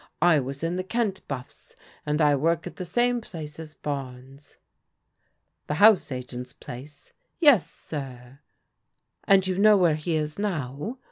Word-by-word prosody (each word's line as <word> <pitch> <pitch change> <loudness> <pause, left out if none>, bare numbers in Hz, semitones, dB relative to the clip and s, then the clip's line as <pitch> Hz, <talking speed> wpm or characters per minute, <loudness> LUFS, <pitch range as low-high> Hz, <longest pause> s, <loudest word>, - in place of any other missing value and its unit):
I 175 -4 +5
was 135 +3 -5
in 170 +2 -1
the 185 - -2
Kent 210 -1 -1
BuflFs, 130 -3 -8 0.3
and 150 +1 +1
I 145 -1 +5
work 165 +4 0
at - - -8
the 185 - -4
same 240 +5 +1
place 155 -7 -9
as 155 -1 -9
Barnes." 135 0 -7 0.5
" - - -48
The 150 - -1
house 205 -3 +5
agent's 125 -1 -6
place? 140 +4 -11
" - - -47
" - - -50
Yes, 280 - +5
sir." 130 -3 -8 0.9
"And 195 -2 +5
you 185 0 -1
know 210 0 +6
where 175 -4 +4
he 155 +2 -2
is 155 +2 -2
now?" 175 - -3
155 Hz, 165 wpm, -26 LUFS, 140-190 Hz, 0.9 s, know